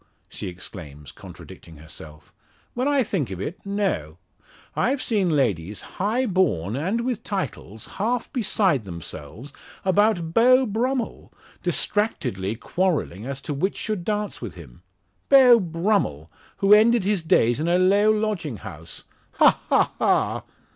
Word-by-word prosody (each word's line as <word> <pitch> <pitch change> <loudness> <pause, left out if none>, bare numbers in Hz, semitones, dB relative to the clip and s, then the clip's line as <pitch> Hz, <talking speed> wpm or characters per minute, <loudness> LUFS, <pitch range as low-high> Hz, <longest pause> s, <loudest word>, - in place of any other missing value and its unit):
she - - -6
exclaims, 85 -5 -9
contradicting 80 -2 -13
herself, 75 0 -12 0.4
"when 250 +3 -1
I 285 -2 +3
think 185 - -2
of 95 -2 -6
it, 155 - -6
no. 195 - -2 0.6
I've 270 +2 +1
seen 210 -7 0
ladies, 105 - 0 0.2
high 225 +6 +1
born, 120 - 0
and 190 - -1
with 245 -2 -2
titles, 180 - -5
half 235 +6 -3
beside 195 - +1
themselves 85 - -9 0.3
about 190 -4 +2
Beau 255 +4 +5
Brummel, 240 +3 -2 0.3
distractedly 125 - -1
quarrelling 140 - -2
as 140 -1 -4
to 150 - -4
which 185 +8 -1
should 215 -5 -3
dance 210 +1 -3
with - - -6
him! - - -13 0.5
Beau 255 -4 +8
Brummel, 165 - -1 0.3
who 200 +1 +5
ended 225 +1 +5
his 200 -1 0
days 120 -6 +2
in 160 - -1
a 175 +1 +3
low 200 +3 +4
lodging 210 - -1
house! 80 -2 -9 0.3
Ha! - - +4
ha! - - +3
ha!" - - +1
185 Hz, 135 wpm, -24 LUFS, -, 0.6 s, Beau